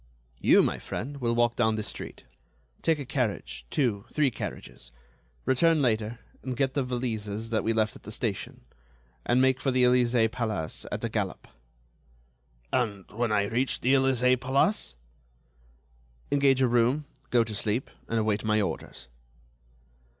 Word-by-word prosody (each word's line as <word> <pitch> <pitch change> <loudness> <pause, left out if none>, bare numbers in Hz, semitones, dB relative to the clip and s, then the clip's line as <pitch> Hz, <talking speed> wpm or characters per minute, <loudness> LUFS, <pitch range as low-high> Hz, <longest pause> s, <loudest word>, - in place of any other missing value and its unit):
"You, - - +6
my - - -1
friend, 140 +5 -5
will 120 -3 0
walk 120 0 +2
down 110 -2 +2
this 110 -1 -3
street, - - -8 0.6
take 165 -1 +2
a 140 - -5
carriage, 125 -5 -3
two, 115 -8 0
three 150 -4 +2
carriages. - - -7 0.5
Return 160 +5 +4
later 115 -3 0 0.2
and 130 -2 -4
get 135 -1 +1
the 145 - +1
valises 115 -4 -3
that 110 - +1
we 115 - +1
left 110 -1 +1
at - - -13
the 105 - -9
station, 110 -3 -3 0.7
and 120 - +4
make 130 0 +3
for 135 - +1
the 130 -1 +3
Elysée 120 -2 +4
Palace 110 -9 -3
at - - -4
a - - +1
galop." - - -3 1.3
"And 105 -7 -1
when 115 +1 -1
I 100 -1 +3
reach 120 +5 -1
the 130 - +3
Elysée 130 -2 +3
Palace?" 135 - +1 1.4
"Engage 135 -2 +4
a - - +5
room, 120 +5 +2 0.2
go 120 -2 +4
to 110 -1 -6
sleep, 105 +4 -1 0.2
and 115 - -1
await 110 -1 +1
my 110 0 +2
orders." 85 - -4
120 Hz, 155 wpm, -28 LUFS, 110-130 Hz, 1.4 s, You